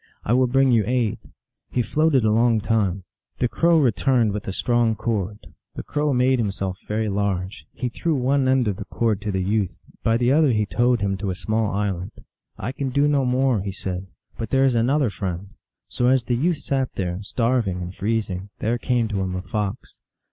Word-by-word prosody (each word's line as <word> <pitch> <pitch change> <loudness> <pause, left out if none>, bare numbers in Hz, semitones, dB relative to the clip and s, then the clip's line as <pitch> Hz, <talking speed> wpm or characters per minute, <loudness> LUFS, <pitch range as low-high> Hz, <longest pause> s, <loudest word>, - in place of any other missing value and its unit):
I 110 - +2
will 130 0 +4
bring 135 +1 +3
you 115 -3 +4
aid." 120 -4 0 0.5
He 125 - 0
floated 150 -3 +2
a 110 - +3
long 115 0 +3
time. 100 -4 0 0.3
The 125 - +1
Crow 170 +7 +3
re 130 -6 +4
turned 120 -1 +2
with 105 - -5
a - - -1
strong 120 +2 +1
cord; 105 -2 -2 0.4
the - - -5
Crow 150 0 -1
made 130 0 +3
himself 95 -3 -2
very 110 +1 -1
large; 95 -5 -2
he 125 - -3
threw 160 +6 -1
one 135 +1 +1
end 130 -2 +3
of 100 -3 -1
the - - -6
cord 110 -4 0
to 105 -1 -2
the 95 -1 -1
youth; 100 -1 +1 0.3
by 115 0 +2
the 120 +1 +2
other 150 -3 +4
he 105 -1 +1
towed 120 +2 +1
him 100 -1 0
to 100 0 -3
a 90 - -2
small 110 +2 -1
island. 100 -1 -2 0.3
" - - -45
I - - -1
can 135 0 -3
do 140 +3 +2
no 140 -2 +2
more," 125 -3 +2
he 100 0 -3
said; 95 -1 -5
" - - -35
but 115 - -3
there 135 0 +3
is 130 - +3
another 125 +2 +2
friend." 95 -1 -4 0.4
So 120 - 0
as 130 -1 +3
the 120 - 0
youth 165 +6 +1
sat 135 -2 -1
there, 90 -1 -2
starving 115 -3 0
and 90 0 -5
freezing, 100 -2 -2
there 120 +2 -1
came 120 -3 +1
to 100 -3 -1
him 95 -1 -2
a 90 - -4
Fox. 105 +3 -4
115 Hz, 215 wpm, -23 LUFS, 100-130 Hz, 0.5 s, will